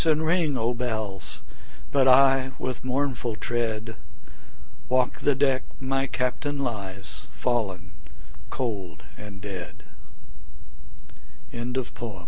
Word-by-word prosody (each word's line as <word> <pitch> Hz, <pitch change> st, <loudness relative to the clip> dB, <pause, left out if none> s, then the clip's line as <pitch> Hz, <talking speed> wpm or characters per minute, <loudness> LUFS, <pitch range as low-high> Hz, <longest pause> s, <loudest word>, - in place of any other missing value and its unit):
and 155 Hz, 0 st, +4 dB
ring, 160 Hz, -4 st, +3 dB
O 115 Hz, +1 st, +2 dB
bells! 110 Hz, -5 st, -3 dB, 0.5 s
But 135 Hz, -2 st, +5 dB
I, 135 Hz, 0 st, +6 dB
with 130 Hz, -1 st, -3 dB
mournful 130 Hz, -3 st, 0 dB
tread, 115 Hz, -1 st, -2 dB, 0.9 s
Walk 130 Hz, 0 st, +2 dB
the 145 Hz, -, +3 dB
deck 135 Hz, -1 st, +3 dB, 0.2 s
my 135 Hz, +1 st, 0 dB
Captain 135 Hz, +3 st, -1 dB
lies, 100 Hz, -8 st, -4 dB
Fallen 105 Hz, -6 st, -1 dB, 0.6 s
cold 100 Hz, -, -3 dB, 0.2 s
a 100 Hz, -4 st, -6 dB
125 Hz, 90 wpm, -27 LUFS, 105-135 Hz, 0.9 s, I